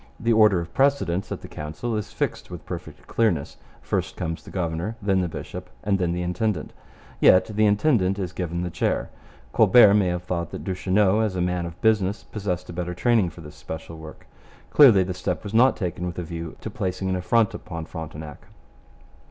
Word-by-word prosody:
The 115 Hz, 0 st, +2 dB
order 105 Hz, -4 st, +5 dB
of 85 Hz, 0 st, -7 dB
precedence 135 Hz, -10 st, +1 dB
at -, -, -4 dB
the -, -, -9 dB
Council 75 Hz, +10 st, -5 dB
is 105 Hz, -1 st, -4 dB
fixed -, -, -3 dB
with -, -, -9 dB
perfect -, -, -8 dB
clearness. 95 Hz, -11 st, 0 dB, 0.3 s
First -, -, -2 dB
comes 80 Hz, 0 st, -3 dB
the -, -, -13 dB
governor, 85 Hz, +4 st, -3 dB
then 95 Hz, -2 st, +1 dB
the 90 Hz, -, 0 dB
bishop, 80 Hz, -, -7 dB
and 100 Hz, -1 st, +1 dB
then 90 Hz, -2 st, 0 dB
the 90 Hz, +1 st, -2 dB
intendant. 90 Hz, 0 st, -2 dB, 0.5 s
Yet 90 Hz, -, +6 dB
the 110 Hz, 0 st, +4 dB
intendant 105 Hz, -3 st, +2 dB
is 90 Hz, -3 st, -4 dB
given 85 Hz, -1 st, -3 dB
the 90 Hz, -, -3 dB
chair. -, -, -1 dB, 0.4 s
Colbert 110 Hz, -1 st, +7 dB
may 100 Hz, -3 st, +3 dB
have 90 Hz, 0 st, -2 dB
thought 85 Hz, -2 st, -3 dB
that -, -, -6 dB
Duchesneau 95 Hz, +2 st, +2 dB
as 110 Hz, -4 st, 0 dB
a -, -, -2 dB
man 90 Hz, -1 st, -1 dB
of 85 Hz, +1 st, -10 dB
business 105 Hz, -2 st, +2 dB
possessed 90 Hz, -4 st, -4 dB
a -, -, -9 dB
better 90 Hz, 0 st, -4 dB
training 110 Hz, -1 st, +2 dB
for 85 Hz, -, -13 dB
this 75 Hz, -1 st, -11 dB
special 80 Hz, +1 st, -8 dB
work. 80 Hz, 0 st, -11 dB, 0.5 s
Clearly 120 Hz, -10 st, +7 dB
the 90 Hz, 0 st, -4 dB
step 90 Hz, -2 st, -3 dB
was 105 Hz, -, -7 dB
not 125 Hz, +4 st, +5 dB
taken 90 Hz, -2 st, -3 dB
with 85 Hz, -, -6 dB
a 90 Hz, -, -3 dB
view 85 Hz, -1 st, -7 dB
to -, -, -6 dB
placing 95 Hz, +1 st, -3 dB
an 95 Hz, -, 0 dB
affront 105 Hz, +4 st, +2 dB
upon 85 Hz, -1 st, -6 dB
Frontenac. 80 Hz, -2 st, -8 dB
90 Hz, 200 wpm, -24 LUFS, 85-105 Hz, 0.5 s, Colbert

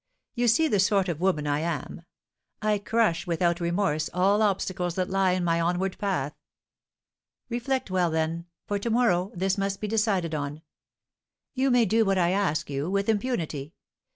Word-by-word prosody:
You 245 Hz, -1 st, 0 dB
see 275 Hz, +8 st, +4 dB
the 210 Hz, -9 st, +1 dB
sort 195 Hz, -1 st, +2 dB
of 165 Hz, -1 st, -3 dB
woman 180 Hz, -6 st, +1 dB
I 145 Hz, 0 st, 0 dB
am: 165 Hz, 0 st, -4 dB, 0.6 s
I 210 Hz, -1 st, +1 dB
crush 205 Hz, -5 st, +1 dB
without 170 Hz, 0 st, +1 dB
remorse 170 Hz, -3 st, 0 dB
all 195 Hz, +4 st, +3 dB
obstacles 185 Hz, -4 st, 0 dB
that 185 Hz, 0 st, -2 dB
lie 190 Hz, -1 st, +2 dB
in 185 Hz, -1 st, -1 dB
my 170 Hz, -1 st, +1 dB
onward 180 Hz, +3 st, 0 dB
path. 180 Hz, -8 st, -1 dB, 1.2 s
Reflect 250 Hz, -1 st, -2 dB
well, 180 Hz, -2 st, +2 dB
then, 160 Hz, +1 st, -2 dB, 0.2 s
for 205 Hz, 0 st, -2 dB
to 235 Hz, -, -3 dB
morrow 205 Hz, -6 st, +2 dB
this 190 Hz, +2 st, 0 dB
must 195 Hz, 0 st, -1 dB
be 210 Hz, -, -3 dB
decided 205 Hz, -6 st, 0 dB
on. 150 Hz, +1 st, -4 dB, 0.9 s
You 270 Hz, +1 st, +1 dB
may 245 Hz, -2 st, +4 dB
do 225 Hz, +3 st, +3 dB
what 195 Hz, -2 st, +1 dB
I 175 Hz, -1 st, +3 dB
ask 175 Hz, -6 st, 0 dB
you 140 Hz, +3 st, -3 dB
with 200 Hz, +2 st, 0 dB
impunity. 175 Hz, -, -2 dB
185 Hz, 170 wpm, -26 LUFS, 170-210 Hz, 1.2 s, see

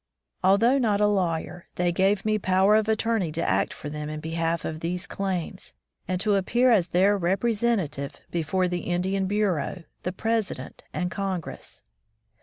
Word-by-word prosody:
Although 225 Hz, +8 st, +4 dB
not 215 Hz, -5 st, +2 dB
a 210 Hz, -, +4 dB
lawyer, 175 Hz, -4 st, -1 dB
they 175 Hz, 0 st, +1 dB
gave 195 Hz, +3 st, +2 dB
me 215 Hz, 0 st, +2 dB
power 190 Hz, +2 st, +4 dB
of 220 Hz, 0 st, +2 dB
attorney 220 Hz, -5 st, +1 dB
to 165 Hz, +1 st, -1 dB
act -, -, +1 dB
for -, -, -8 dB
them 150 Hz, 0 st, -5 dB
in 155 Hz, 0 st, -5 dB
behalf 165 Hz, +1 st, -2 dB
of 155 Hz, 0 st, -4 dB
these 175 Hz, +2 st, -2 dB
claims, 190 Hz, -2 st, -4 dB, 0.3 s
and 185 Hz, -1 st, -1 dB
to 210 Hz, 0 st, +2 dB
appear 240 Hz, +6 st, +3 dB
as 190 Hz, -7 st, +4 dB
their 195 Hz, +4 st, +3 dB
representative 195 Hz, -5 st, 0 dB
before 175 Hz, +2 st, 0 dB
the 180 Hz, 0 st, -2 dB
Indian 185 Hz, +3 st, -1 dB
Bureau, 190 Hz, -5 st, -1 dB, 0.2 s
the 180 Hz, -, -2 dB
President, 225 Hz, +1 st, -2 dB
and 180 Hz, -1 st, -2 dB
Congress. 190 Hz, -4 st, -5 dB
190 Hz, 160 wpm, -26 LUFS, 170-210 Hz, 0.3 s, Although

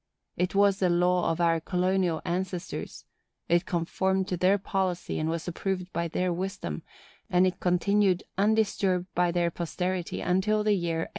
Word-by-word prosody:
It 180 Hz, +2 st, -1 dB
was 200 Hz, 0 st, +4 dB
the 185 Hz, -, +2 dB
law 180 Hz, 0 st, +2 dB
of 165 Hz, -, -3 dB
our 165 Hz, -1 st, +3 dB
colonial 180 Hz, -1 st, 0 dB
ancestors; 180 Hz, 0 st, -4 dB, 0.4 s
it 175 Hz, +1 st, +2 dB
conformed 190 Hz, +2 st, 0 dB
to 180 Hz, -, 0 dB
their 185 Hz, +3 st, +4 dB
policy 190 Hz, -2 st, -2 dB
and 155 Hz, +1 st, -1 dB
was 165 Hz, +1 st, -3 dB
approved 185 Hz, +1 st, -3 dB
by 170 Hz, +1 st, -1 dB
their 180 Hz, +2 st, -1 dB
wisdom, 180 Hz, -, -4 dB, 0.5 s
and 180 Hz, +1 st, +4 dB
it 185 Hz, -, -1 dB
continued 190 Hz, +1 st, +2 dB
undisturbed 200 Hz, -3 st, +1 dB
by 180 Hz, 0 st, +2 dB
their 170 Hz, -1 st, +1 dB
posterity 180 Hz, +1 st, -3 dB
until 205 Hz, +4 st, +1 dB
the 210 Hz, 0 st, +3 dB
year 170 Hz, -4 st, -1 dB
1821. -, -, -13 dB
180 Hz, 160 wpm, -28 LUFS, 175-190 Hz, 0.5 s, was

